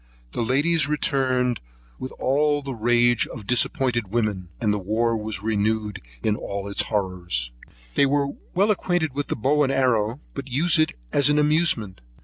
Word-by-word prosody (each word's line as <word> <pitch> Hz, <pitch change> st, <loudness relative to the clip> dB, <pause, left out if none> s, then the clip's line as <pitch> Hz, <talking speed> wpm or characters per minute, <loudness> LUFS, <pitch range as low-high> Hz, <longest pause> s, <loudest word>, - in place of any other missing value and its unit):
The -, -, -3 dB
ladies 145 Hz, +6 st, +2 dB
returned 130 Hz, -4 st, +1 dB, 0.4 s
with 130 Hz, -, -6 dB
all 145 Hz, +2 st, +1 dB
the 135 Hz, -1 st, -4 dB
rage 120 Hz, +1 st, +3 dB
of 115 Hz, -5 st, -9 dB
disappointed 120 Hz, -1 st, +1 dB
women, 105 Hz, -4 st, -2 dB
and 105 Hz, -3 st, +1 dB
the 105 Hz, -, -1 dB
war 115 Hz, +4 st, 0 dB
was 105 Hz, -2 st, -4 dB
renewed 105 Hz, -1 st, -1 dB, 0.2 s
with 105 Hz, -, +1 dB
all 100 Hz, 0 st, -5 dB
its 100 Hz, -, 0 dB
horrors. 90 Hz, -, -2 dB, 0.4 s
They -, -, +4 dB
are 140 Hz, 0 st, +1 dB, 0.3 s
well 200 Hz, +4 st, +3 dB
acquainted 175 Hz, -7 st, 0 dB
with 145 Hz, +1 st, -3 dB
the -, -, -2 dB
bow 145 Hz, +6 st, +1 dB
and 135 Hz, -2 st, +2 dB
arrow, 125 Hz, -3 st, +1 dB
but 140 Hz, -1 st, -6 dB
use 160 Hz, +6 st, +2 dB
it 155 Hz, -, +2 dB, 0.2 s
as 145 Hz, 0 st, +4 dB
an 145 Hz, -, +3 dB
amusement. 150 Hz, -, +1 dB
120 Hz, 165 wpm, -23 LUFS, 105-145 Hz, 0.4 s, They